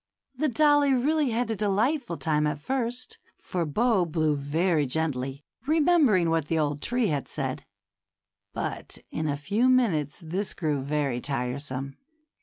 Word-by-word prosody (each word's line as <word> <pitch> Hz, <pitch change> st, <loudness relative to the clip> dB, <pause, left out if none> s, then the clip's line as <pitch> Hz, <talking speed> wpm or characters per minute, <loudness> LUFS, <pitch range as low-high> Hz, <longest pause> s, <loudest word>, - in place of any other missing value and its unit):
The 305 Hz, +5 st, +1 dB
dollie 290 Hz, 0 st, +4 dB
really 295 Hz, +3 st, +2 dB
had 230 Hz, 0 st, -1 dB
a -, -, 0 dB
delightful 215 Hz, -, 0 dB
time 150 Hz, -1 st, +1 dB
at 150 Hz, -1 st, -2 dB
first, 245 Hz, -, -3 dB, 0.2 s
for 175 Hz, -3 st, -3 dB
Bo 220 Hz, -, +2 dB
blew 155 Hz, -2 st, +1 dB
very 150 Hz, +2 st, +1 dB
gently, 135 Hz, -1 st, -2 dB, 0.2 s
remembering 295 Hz, -, +4 dB
what 165 Hz, -3 st, 0 dB
the 165 Hz, -, 0 dB
old 145 Hz, -2 st, 0 dB
tree 245 Hz, -3 st, 0 dB
had 145 Hz, -3 st, -2 dB
said; -, -, -4 dB, 0.8 s
but -, -, -4 dB
in 155 Hz, -, -2 dB
a 140 Hz, -, -1 dB
few 205 Hz, -, +1 dB
minutes 180 Hz, -, +2 dB
this 185 Hz, +5 st, -3 dB
grew 150 Hz, -5 st, -1 dB
very 140 Hz, -3 st, -1 dB
tiresome. 135 Hz, 0 st, -3 dB
165 Hz, 145 wpm, -27 LUFS, 145-245 Hz, 0.8 s, dollie